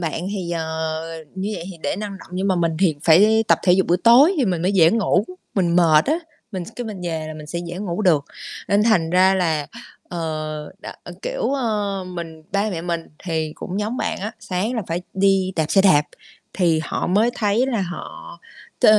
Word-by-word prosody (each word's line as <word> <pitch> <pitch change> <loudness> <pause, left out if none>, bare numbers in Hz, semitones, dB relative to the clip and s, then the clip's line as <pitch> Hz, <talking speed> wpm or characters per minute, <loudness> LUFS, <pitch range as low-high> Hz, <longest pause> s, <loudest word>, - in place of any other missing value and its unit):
bạn 170 +1 -3
thì, 185 -4 -4
ờ, 165 -2 -2 0.7
như 190 +2 -3
vậy 165 - -6
thì 180 - -10
để - - -1
năng 205 -1 -5
động, - - -14
nhưng 190 +2 -1
mà 185 - +2
mình 170 -1 +1
thì 180 -5 +3
phải 210 +7 +5
tập - - +5
thể 180 - +4
dục 190 +1 +3
buổi 175 - +3
tối 265 +10 +7
thì 280 - +2
mình 180 -6 -1
mới 185 +3 +1
dễ 165 -4 +6
ngủ. 205 -3 +2 0.3
Mình 175 -3 +2
mệt 160 -3 +5
á, 310 +4 +2 0.3
mình 185 - -3
cái 245 - -4
mình 210 -4 -6
về 160 -2 -3
là 155 - -6
mình 155 -1 -9
sẽ 170 +3 -4
dễ 175 +1 -6
ngủ 195 0 -3
được, 155 -7 +3 0.4
nên 200 +1 +3
thành 200 -8 +2
ra 185 +2 +5
là, 160 -6 0 0.4
ờ, 155 -3 -4
đ - - -10 0.4
kiểu, - - -3
ờ, 210 -7 -1
mình 165 -3 -7
ba 200 +2 +1
mẹ 165 -4 -4
mình 170 -1 -2 0.2
thì 160 -3 -2
cũng 190 +3 -4
giống 215 +4 -2
bạn 225 -3 -2
á, 210 +3 -4
sáng 210 +3 -2
là 225 - -1
phải 170 +2 -3
đi 190 -1 +2
đạp 160 -2 +1
xe 195 - +4
đạp 150 -7 +5 0.5
thì 170 -4 +2
họ - - -2
mới 210 +7 +3
thấy 215 +4 +1
là 240 -5 -1
họ 175 -2 -7 0.4
t - - -2
185 Hz, 215 wpm, -21 LUFS, 165-210 Hz, 0.7 s, tối